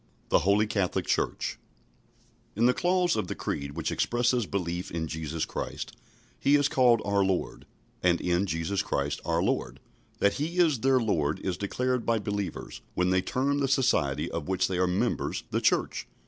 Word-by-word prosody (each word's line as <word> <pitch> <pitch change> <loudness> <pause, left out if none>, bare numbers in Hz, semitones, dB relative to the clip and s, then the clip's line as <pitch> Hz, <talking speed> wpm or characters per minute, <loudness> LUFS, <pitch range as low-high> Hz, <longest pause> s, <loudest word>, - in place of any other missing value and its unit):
THE - - +5
HOLY 100 +5 +3
CATHOLIC 100 -4 -1
CHURCH - - -1 1.0
In 115 +4 +2
the 125 - +5
clause 180 +2 +2
of 105 -4 -1
the - - -4
Creed 70 0 -4
which - - -2
expresses 120 -2 +1
belief 90 -2 -3
in 80 -1 -3
Jesus 80 +1 -3
Christ, - - -5 0.4
He 140 - +4
is 145 -1 +4
called 125 -5 +4
our 100 0 +2
Lord 95 -2 -2 0.3
"And 90 -1 +3
in 90 +2 +1
Jesus 90 +4 -1
Christ 70 -5 -2
our - - +1
Lord." - - -1 0.4
That 100 0 +3
He 165 +4 -2
is 160 -8 +4
their 130 +1 +3
Lord 80 -10 0
is 95 -2 -2
declared 125 +6 -1
by 115 -1 +2
believers, 100 -4 -4
when 90 0 +2
they 95 0 +3
term 140 +7 0
the 140 - +1
society 75 - +2
of - - -4
which 95 0 +1
they 95 -2 -2
are 90 - +3
members 90 +1 -1
"the - - 0
Church." - - +1
100 Hz, 175 wpm, -28 LUFS, 90-125 Hz, 1.0 s, THE